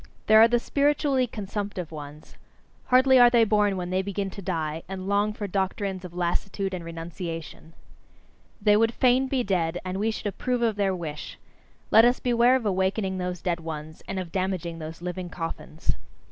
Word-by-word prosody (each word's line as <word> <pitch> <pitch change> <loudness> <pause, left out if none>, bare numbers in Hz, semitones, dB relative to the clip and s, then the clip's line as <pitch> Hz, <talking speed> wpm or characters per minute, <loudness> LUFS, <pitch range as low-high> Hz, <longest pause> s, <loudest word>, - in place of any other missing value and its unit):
There 220 0 +7
are 225 - +9
the 240 +1 +2
spiritually 280 0 +1
consumptive 200 -5 -5
ones: 150 -1 -10 0.5
hardly 260 +1 +5
are 245 0 +8
they 240 -1 +5
born 210 -2 +2
when 180 0 -4
they 185 +1 +1
begin 195 0 -3
to 200 - -8
die, 160 -4 -2
and 190 0 -5
long 205 +1 +2
for 210 0 -5
doctrines 190 0 -2
of 175 -1 -9
lassitude 190 +2 -1
and 180 -2 -4
renunciation. 165 -1 -7 0.9
They 210 -1 +4
would 225 +2 +2
fain 255 +1 +3
be 260 -2 0
dead, 175 -4 0
and 185 +1 -3
we 215 +2 +1
should 220 - -5
approve 240 +5 -1
of 225 -2 +2
their 195 -2 +1
wish! 155 -4 -6 0.5
Let 220 - +8
us 245 +1 +4
beware 245 +1 +4
of 255 -4 -1
awakening 190 0 0
those 180 -1 -4
dead 175 -1 0
ones, 155 -1 -7
and 195 - -4
of 180 -3 -4
damaging 185 -3 -2
those 160 +2 -8
living 180 0 -4
coffins! 165 -1 -4
190 Hz, 180 wpm, -26 LUFS, 175-220 Hz, 0.9 s, are